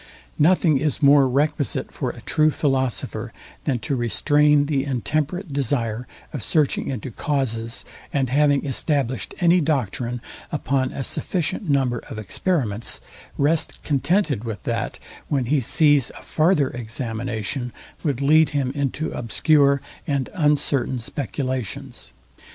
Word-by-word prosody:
Nothing 160 -2 +4
is 150 +1 -1
more 140 -1 +7
requisite 145 +2 0
for - - -3
a - - -8
true 155 -1 +3
philosopher, 130 -7 -1 0.3
than 130 - +1
to 140 +1 -1
restrain 145 +4 +3
the 140 -2 0
intemperate 150 - -2
desire 125 -4 -1 0.3
of 145 - -4
searching 150 +2 +1
into 130 -1 -4
causes, 115 -4 -2 0.3
and 135 -2 +1
having 145 +2 +3
established 135 -2 -1
any 175 0 +5
doctrine 125 - -1 0.3
upon 135 -2 0
a 135 - -4
sufficient 170 - -2
number 130 -4 +2
of - - -6
experiments, 110 - -1 0.4
rest 150 +3 +2
contented 145 - +1
with 110 -5 -5
that, - - -2 0.3
when 135 -4 0
he 145 +4 +2
sees 145 0 +3
a - - -12
farther 155 -4 +2
examination 120 +1 -3 0.3
would 140 -5 -1
lead 155 +1 +5
him 130 -2 0
into 140 +2 -2
obscure 140 +3 +3 0.3
and 140 -3 -1
uncertain 145 -6 +1
speculations. 130 - -4
140 Hz, 125 wpm, -23 LUFS, 125-150 Hz, 0.4 s, more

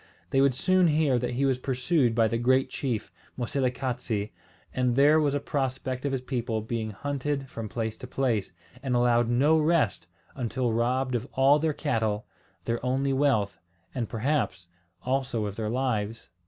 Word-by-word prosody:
They 135 - +4
would 135 -2 +3
soon 185 +5 +3
hear 150 -5 +3
that 125 0 -2
he 135 +2 +1
was 130 -2 +1
pursued 130 -1 +1
by 115 -1 +4
the 115 +2 -1
great 130 +2 +2
chief 120 -6 -3 0.3
Moselekatse, 125 -4 -2 0.4
and 125 -1 +1
there 145 +3 +6
was 145 -2 +1
a - - +1
prospect 130 -2 -2
of 140 - 0
his 135 -2 -1
people 120 -4 -2
being 110 0 -3
hunted 140 +5 -3
from 115 -4 -6
place 110 -1 -3
to 125 - -9
place, 120 -6 0 0.3
and 130 -2 -1
allowed 120 -1 +3
no 145 +7 +4
rest 155 - +1 0.3
until 125 -1 -1
robbed 125 +3 0
of 120 +1 -2
all 135 +3 +5
their 160 +1 +1
cattle, 110 -8 -1 0.4
their 115 +1 -2
only 135 +2 +1
wealth, 110 -9 +1 0.3
and 120 -4 -3
perhaps 115 - -1 0.3
also 130 -4 -1
of 100 -1 -4
their 110 -1 -2
lives. 115 -3 -2
125 Hz, 170 wpm, -27 LUFS, 115-135 Hz, 0.4 s, there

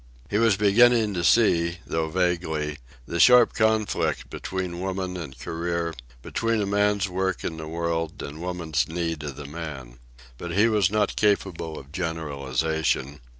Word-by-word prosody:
He 105 - +2
was 115 -4 +4
beginning 110 +1 +4
to 85 -2 -2
see, 85 -5 +3
though 80 -1 -1
vaguely, 80 -4 -1 0.3
the 85 - -4
sharp 125 +2 +7
conflict 110 -2 0
between 90 -2 -4
woman 95 0 -3
and 75 -7 -7
career, 85 0 -3 0.3
between 115 -1 -1
a 105 - 0
man's 100 0 +1
work 95 0 -2
in 80 - -3
the 80 -1 -6
world 85 0 -2
and 75 +3 -7
woman's 85 -3 -1
need 80 -2 -2
of 75 -3 -6
the 75 +1 -8
man. 70 -6 -8 0.4
But 85 -1 -5
he 105 +5 +4
was 105 -5 +3
not 105 0 0
capable 95 -6 0
of 70 +1 -11
generalization. 75 -3 -2
85 Hz, 150 wpm, -25 LUFS, 80-100 Hz, 0.4 s, sharp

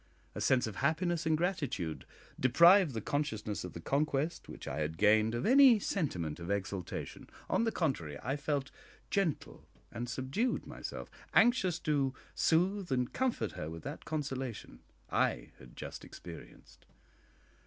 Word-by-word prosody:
A - - -5
sense 130 -2 +3
of 110 -3 -6
happiness 165 +3 0
and 160 -1 +3
gratitude 145 - -2 0.3
deprived 170 - +6
the 110 - -2
consciousness 110 -7 -2
of 90 - -7
the - - -7
conquest 145 - -1
which - - -9
I 65 - -3
had 80 +1 -2
gained 110 +2 +4
of 120 - -2
any 260 -1 +8
sentiment 90 - -2
of 85 +1 -7
exultation; 100 -2 -4 0.2
on 230 - +2
the 225 - +1
contrary, 85 - -1
I 135 +4 -1
felt 145 -2 -2 0.4
gentle 195 -7 -1 0.3
and 120 +1 -5
subdued 135 - -1
myself - - -7 0.2
anxious 220 -8 +4
to 140 -4 +1 0.2
soothe 180 +2 +1
and 125 -2 0
comfort 245 - 0
her 75 - -5
with 80 0 -8
that 145 +3 -6
consolation 135 - -4 0.3
I - - 0
had 65 -1 -14
just - - -7
experienced. - - -12
135 Hz, 145 wpm, -33 LUFS, 105-170 Hz, 0.4 s, any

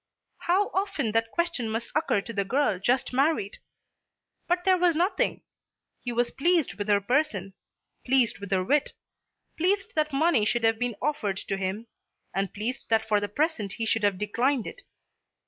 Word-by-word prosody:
How 380 +4 +3
often 380 - -1
that 225 +1 +1
question 340 -7 -1
must 225 +2 -3
occur 305 -9 +1
to 230 - -8
the 200 - 0
girl 215 -2 +1
just 250 +6 +1
married. 270 -6 +1 0.9
But 355 +1 +1
there 370 -1 +4
was 350 -2 +3
nothing. 355 +5 0 0.6
He 245 - -4
was 240 0 0
pleased 335 +1 +1
with 205 0 -5
her 205 -1 +4
person; 200 -4 0 0.5
pleased 255 -3 +2
with 200 -1 -7
her 190 -1 +1
wit; 290 +9 +1 0.6
pleased 390 +5 0
that 305 -1 0
money 280 -4 +3
should 235 +2 +1
have 225 0 +3
been 245 -2 -1
offered 215 -10 -1
to 195 - -3
him, 195 +4 -3 0.5
and 195 0 -1
pleased 230 +6 -5
that 220 -1 +2
for 210 -1 +3
the 205 0 -3
present 220 - -1
he 230 - -3
should 225 0 +1
have 205 -2 +2
declined 235 +5 0
it. - - -8
240 Hz, 175 wpm, -27 LUFS, 210-310 Hz, 0.9 s, there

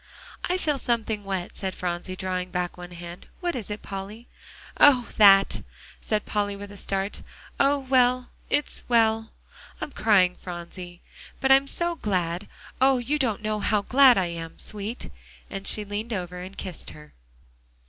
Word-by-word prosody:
"I 360 - 0
feel 300 -6 0
something 220 -4 -1
wet," 190 -3 -4
said 190 -2 -3
Phronsie, 180 +1 -3
drawing 185 -1 -3
back 180 -1 -2
one 180 0 -9
hand. 175 +1 -9
"What 350 -1 -2
is 225 -5 -5
it, 210 0 -5
Polly?" 200 +4 -7 0.5
"Oh! 255 -5 +6
that," 195 -2 +7 0.4
said 215 -1 -1
Polly 205 -1 -1
with 200 0 -9
a - - -10
start. 195 +1 -2 0.4
"Oh 280 +1 +4
well, 255 -2 +2 0.2
it's 295 - -1
well, 225 -2 +3 0.5
I'm - - -5
crying, 190 -7 +3
Phronsie; 175 0 -8 0.4
but 270 - +2
I'm 270 +1 +6
so 345 +4 -1
glad 185 - -2 0.3
oh! 265 0 +5
you 275 +5 -1
don't 225 -6 0
know 215 0 -1
how 210 0 +1
glad 260 +1 +6
I 190 - +2
am, 165 -1 -6
sweet," 215 +3 -5 0.4
and 195 0 -4
she 210 - +3
leaned 210 +3 -4
over 180 -2 -4
and 185 +2 -9
kissed 185 -4 -6
her. 75 -3 -13
205 Hz, 160 wpm, -26 LUFS, 180-245 Hz, 0.5 s, that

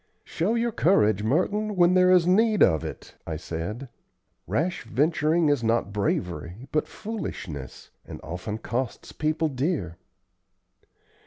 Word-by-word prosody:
"Show 200 +8 -1
your 235 0 0
courage, 110 - +3
Merton, 200 - 0
when 175 0 +5
there 185 0 +5
is 180 -2 +5
need 215 +3 +4
of 80 -5 +3
it," - - -8
I 80 -2 -3
said. 90 - -5 0.6
"Rash 175 +4 -1
venturing 155 +6 +2
is 145 -5 +1
not 115 -3 +1
bravery, 90 - -2
but 155 - 0
foolishness, 85 - -7
and - - -9
often 90 +6 -5
costs 120 +2 -4
people 155 +1 0
dear." 130 - -2
145 Hz, 130 wpm, -26 LUFS, -, 0.6 s, when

